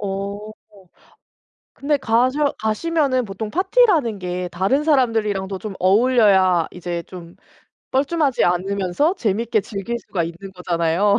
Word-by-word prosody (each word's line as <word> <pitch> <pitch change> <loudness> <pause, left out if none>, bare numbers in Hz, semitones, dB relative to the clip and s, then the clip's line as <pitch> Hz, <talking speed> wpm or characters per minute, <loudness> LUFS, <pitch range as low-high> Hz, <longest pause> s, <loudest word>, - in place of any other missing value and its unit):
어 200 0 -4 1.4
근데 290 +1 0
가셔 255 +4 +1
가시면은 255 +3 0
보통 210 +1 -6
파티라는 355 - +2
게 180 0 -4
다른 195 +12 0
사람들이랑도 215 -9 +1
좀 210 0 -7
어울려야 190 -4 +4
이제 175 -1 -5
좀 175 -2 -11 0.6
뻘쭘하지 280 0 +1
않으면서 195 - 0
재밌게 225 - 0
즐길 220 +3 -5
수가 190 -6 -3
있는 170 +4 -9
거잖아요. 175 +3 +1
210 Hz, 285 characters per minute, -20 LUFS, 185-260 Hz, 1.4 s, 어울려야